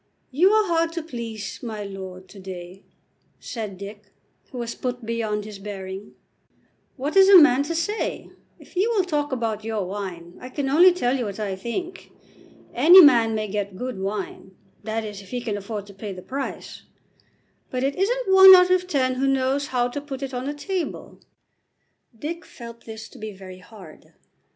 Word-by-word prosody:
"You 335 +9 +4
are 430 0 +4
hard 330 -1 +1
to 335 -2 -4
please, 230 -8 -6
my 220 -4 -5
lord, 190 -2 -8
to 200 - -13
day," 185 0 -9 0.6
said 215 -6 -6
Dick, 205 +2 -9 0.5
who 255 - -8
was 235 -1 -4
put 250 -2 -5
beyond 220 -2 -2
his 210 -2 -9
bearing. 195 -1 -8 0.8
"What 285 +6 -3
is 385 0 +7
a 395 - +10
man 280 -5 +6
to 315 +4 -3
say? 375 +7 -3 0.3
If - - -18
you 390 +6 +2
will 430 -5 +2
talk 295 -5 -2
about 225 -4 -2
your 220 -3 -2
wine, 180 -3 -7
I 255 - -8
can 270 +1 -3
only 345 +6 +7
tell 270 -8 0
you 250 -3 -2
what 200 0 -6
I 200 -3 -2
think. 345 - -6 0.6
Any 325 +10 +8
man 235 -9 +6
may 215 0 -2
get 200 -1 -4
good 250 -2 -5
wine, 195 -1 -5 0.3
that 220 +1 -3
is 205 -1 -7
if 195 - -16
he 250 - -3
can 230 -4 -3
afford 205 0 -5
to 200 - -14
pay 200 +1 -7
the 185 -1 -9
price, 275 +1 -6 0.9
but 255 0 -3
it 275 +1 0
isn't 420 +1 0
one 380 0 +11
out 360 0 +5
of 365 0 +2
ten 260 -6 +1
who 275 - +2
knows 270 +1 +1
how 245 -3 0
to 285 +4 -5
put 275 -2 -7
it 270 -1 -5
on 250 +1 -4
the 290 - -2
table." 365 +3 -5 1.0
Dick 330 +7 -5
felt 235 -1 -12
this 220 0 -8
to - - -15
be 215 -1 -6
very 185 -1 -11
hard. 185 -5 -15
235 Hz, 190 wpm, -23 LUFS, 205-295 Hz, 1.0 s, one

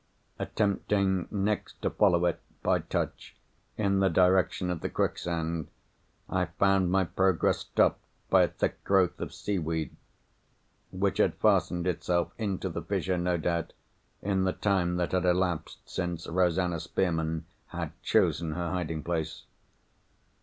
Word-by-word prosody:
Attempting, 100 -3 0
next, 105 +1 -2
to - - +1
follow 90 -4 +3
it, 85 - 0 0.2
by - - +3
touch, - - -4 0.4
in 100 -2 +2
the 95 0 +4
direction 90 +1 +3
of 85 - -3
the - - -2
quicksand, 85 -1 -1 0.6
I 95 -1 0
found 95 +2 +2
my 95 +1 +3
progress 95 0 +2
stopped - - +1 0.2
by - - +5
a - - +5
thick - - -3
growth 95 -3 +2
of - - -4
seaweed—which 90 +2 -5
had - - +3
fastened 90 0 +2
itself 90 -1 0
into 100 -3 -2
the 85 -1 -4
fissure, 90 +1 -1
no 90 0 +1
doubt, 85 0 -1 0.5
in 95 -1 +1
the 95 - +1
time 95 -4 +1
that 90 -1 -1
had 95 -2 +1
elapsed 90 -2 0
since 85 -2 -3
Rosanna 90 0 +1
Spearman 80 -2 -1 0.2
had - - -4
chosen 80 -1 +2
her 85 0 -2
hiding 80 -4 -2
place. 80 -2 -3
90 Hz, 135 wpm, -29 LUFS, 85-95 Hz, 0.6 s, by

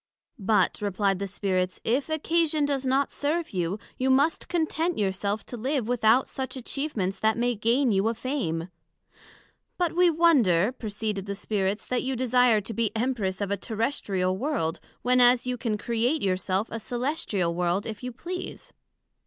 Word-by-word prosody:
But, 210 +1 +2
replied 200 -1 0
the 200 - -2
Spirits, 185 -2 -1
if 260 +7 0
occasion 315 -1 +1
does 275 -2 -1
not 270 +2 +2
serve 315 +3 -1
you, 180 +1 -1 0.2
you 260 +1 +1
must 280 +5 +2
content 330 0 0
your 200 -2 +1
self 200 +2 -3
to 245 - -7
live 260 0 -1
without 240 +1 +3
such 265 -1 -5
atchievements 245 -7 -2
that 220 0 +2
may 245 +1 +1
gain 235 +4 +2
you 195 +1 +2
a 230 - 0
Fame: 185 - -2 1.1
But 350 -2 0
we 355 0 +5
wonder, 255 - +4
proceeded 210 -4 -4
the 200 - -3
Spirits, 200 0 -1
that 250 - 0
you 265 0 -2
desire 250 -3 +3
to 220 +3 -6
be 230 -2 +1
Empress 220 -6 -1
of 200 -1 -2
a 200 - +1
Terrestrial 200 -5 -1
World, 200 - -1 0.2
when 250 0 +4
as 245 0 +5
you 250 0 -1
can 225 -3 -2
create 235 +7 0
your 190 -2 +2
self 190 +3 -2
a - - -3
Cœlestial 230 - -1
World 175 +3 0
if 215 -2 -6
you 250 0 -4
please. 355 +9 -7
230 Hz, 170 wpm, -26 LUFS, 200-270 Hz, 1.1 s, we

